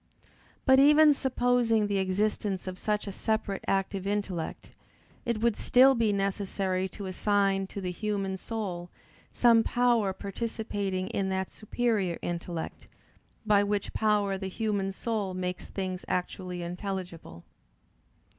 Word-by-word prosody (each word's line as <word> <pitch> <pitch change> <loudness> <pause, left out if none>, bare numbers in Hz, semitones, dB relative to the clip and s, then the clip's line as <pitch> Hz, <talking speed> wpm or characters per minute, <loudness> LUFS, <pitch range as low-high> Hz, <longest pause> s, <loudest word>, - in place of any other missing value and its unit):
But, 265 -1 +6
even 300 +2 +7
supposing 245 -4 +2
the 200 -1 0
existence 195 0 -1
of 185 -1 -6
such 210 -1 -1
a 200 - -4
separate 215 -1 -2
active 195 0 0
intellect, 200 -5 -3 0.6
it 235 -2 0
would 235 -2 +3
still 260 +2 +5
be 230 -4 +2
necessary 195 -1 -1
to 200 +1 -8
assign 195 0 +1
to 200 - -7
the 180 -1 -2
human 195 -1 -2
soul 185 -5 -4 0.4
some 235 -2 +5
power 235 -4 +2
participating 200 -2 -3
in 195 -1 -1
that 190 0 -2
superior 215 -5 -1
intellect, 170 -1 -5 0.6
by 205 -2 +4
which 205 0 -2
power 205 -3 +1
the 190 - -4
human 200 -1 -1
soul 200 -2 -2
makes 180 0 -3
things 185 -2 -4
actually 180 0 -3
intelligible. 175 - -6
200 Hz, 125 wpm, -29 LUFS, 185-220 Hz, 0.6 s, even